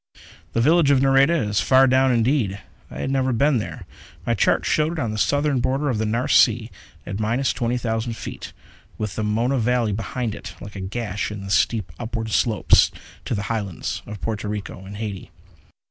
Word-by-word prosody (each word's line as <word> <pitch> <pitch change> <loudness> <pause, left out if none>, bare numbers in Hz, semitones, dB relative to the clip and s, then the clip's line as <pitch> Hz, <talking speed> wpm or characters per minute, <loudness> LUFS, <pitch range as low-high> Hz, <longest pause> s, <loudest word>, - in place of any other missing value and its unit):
The 115 - +1
village 155 +3 +4
of 140 -2 +5
Nareda 135 +4 +4
is 105 -2 +1
far 130 +7 +5
down 130 0 +3
indeed. 115 -4 +1 0.3
I - - -7
had 135 - -2
never 130 -1 +1
been 135 +2 +2
there. 105 - -6 0.4
My - - +1
charts - - +2
showed 155 +2 +1
it - - -6
on 120 -8 -1
the 110 - -4
southern 145 0 +1
border 135 +4 0
of 110 - -2
the 110 - 0
Nares 115 +3 0
Sea, 115 -1 +4 0.3
at 95 - -5
minus 120 +5 0
twenty 120 +1 -1
thousand 115 -1 -2
feet, - - -7 0.5
with 105 -4 -4
the 110 - -2
Mona 115 +5 +1
Valley 120 -1 +1
behind 115 +2 -3
it - - -9
like 100 0 -10
a 95 - -5
gash 105 +1 -3
in 105 -2 -7
the 95 - -6
steep 105 -3 +1
upward 115 -1 -4
slopes 110 0 +4 0.4
to - - -1
the 100 - -2
Highlands 105 -5 -3
of 105 -1 -7
Porto 110 -2 -3
Rico 105 -2 -5
and 100 +1 -8
Haiti. 105 -3 -5
115 Hz, 195 wpm, -22 LUFS, 105-130 Hz, 0.5 s, of